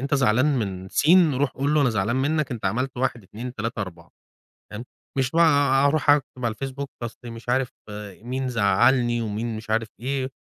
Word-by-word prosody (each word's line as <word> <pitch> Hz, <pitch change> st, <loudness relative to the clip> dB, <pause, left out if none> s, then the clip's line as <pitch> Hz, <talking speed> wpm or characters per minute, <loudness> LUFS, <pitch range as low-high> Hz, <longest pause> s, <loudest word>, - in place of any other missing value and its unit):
أنت 140 Hz, +2 st, -1 dB
زعلان 130 Hz, 0 st, +3 dB
من 95 Hz, -3 st, -4 dB
س 145 Hz, -, 0 dB, 0.3 s
روح 140 Hz, 0 st, +1 dB
قُل 140 Hz, +3 st, -1 dB
له 150 Hz, -, +4 dB
أنا 130 Hz, -4 st, +3 dB
زعلان 110 Hz, +4 st, 0 dB
مِنّك، 150 Hz, +1 st, 0 dB
أنت 115 Hz, -, -7 dB
عملت 125 Hz, +6 st, -2 dB
1، 125 Hz, -3 st, -1 dB
2، 120 Hz, +6 st, -8 dB
3، 110 Hz, +1 st, -3 dB
4، 85 Hz, -3 st, -10 dB, 0.6 s
فاهم، 110 Hz, +3 st, -7 dB, 0.3 s
مش 130 Hz, 0 st, +1 dB
بقى 145 Hz, -5 st, +4 dB
أروح 145 Hz, 0 st, +3 dB
أكتب 130 Hz, -3 st, +1 dB
على 115 Hz, -2 st, 0 dB
الFacebook، 135 Hz, +2 st, -5 dB, 0.2 s
أصل 120 Hz, -, -6 dB
مش 115 Hz, +1 st, -11 dB
عارف 130 Hz, 0 st, +1 dB, 0.5 s
مين 130 Hz, +2 st, -3 dB
زعّلني، 120 Hz, +2 st, +3 dB
ومين 110 Hz, +1 st, -3 dB
مش 110 Hz, 0 st, -9 dB
عارف 110 Hz, 0 st, +1 dB
إيه، 130 Hz, +1 st, -2 dB
125 Hz, 185 wpm, -24 LUFS, 110-135 Hz, 0.6 s, له